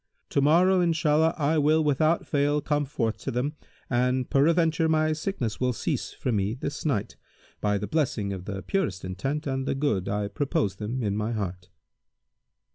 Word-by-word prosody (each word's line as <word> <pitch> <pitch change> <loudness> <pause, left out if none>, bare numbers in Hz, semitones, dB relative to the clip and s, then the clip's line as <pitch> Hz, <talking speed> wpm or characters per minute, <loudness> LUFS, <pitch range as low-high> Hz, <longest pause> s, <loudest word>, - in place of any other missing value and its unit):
To 140 - +2
morrow, 180 +6 +4
Inshallah, 160 -1 +2
I 155 +1 +2
will 155 +2 +3
without 155 +3 +2
fail 145 0 +1
come 145 0 0
forth 115 -5 -2
to - - -4
them, 130 +4 -1 0.3
and 125 +1 +1
peradventure 160 +2 +3
my 155 0 +2
sickness 155 - -3
will 125 -1 +1
cease - - -2
from 120 -4 -2
me 100 +3 0
this 140 +3 -5
night, 130 -10 -1 0.4
by 105 -1 +1
the 100 - -3
blessing 115 -9 -1
of 95 -1 -7
the 95 -2 -5
purest 100 - -1
intent 135 - -3
and 135 -1 -2
the - - 0
good 110 -10 0
I 105 0 -1
purpose 120 -8 0
them 110 +6 -4
in 100 -2 0
my 105 +2 -1
heart." 90 -4 -4
135 Hz, 175 wpm, -26 LUFS, 105-155 Hz, 0.4 s, morrow